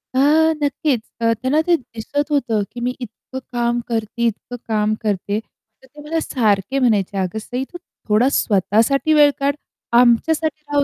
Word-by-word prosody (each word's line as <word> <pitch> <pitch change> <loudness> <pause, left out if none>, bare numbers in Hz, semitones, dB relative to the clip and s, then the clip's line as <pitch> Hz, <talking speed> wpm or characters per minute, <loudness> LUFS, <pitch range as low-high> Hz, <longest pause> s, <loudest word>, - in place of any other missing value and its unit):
हां. 315 +4 +4
नक्कीच. 280 -4 0 0.2
अ, 230 0 +3
त्यांना 280 +5 +2
ते 345 - +5
दिसत 285 +2 -4
होतं 240 -7 +1
की 245 - -8
मी 250 +1 -1
इतकं 260 +4 -10 0.2
काम 240 0 +1
करते, 230 +1 -2
इतकं 245 +4 -11
काम 215 0 +1
करते. 205 0 -1 0.4
तर 265 - -19
ते 295 +3 -14
मला 325 +1 -1
सारखे 220 +1 +1
म्हणायचे, 200 -3 +1
"अगं 190 +3 -2
सई, 250 +4 -4
तू 350 - -7 0.3
थोडा 230 +6 +4
स्वतःसाठी 225 - +2
वेळ 295 -1 +6
काढ. 280 +1 +1 0.5
आमच्यासाठी 305 +6 +2
राहू 285 -1 +3
245 Hz, 160 wpm, -20 LUFS, 215-290 Hz, 0.5 s, वेळ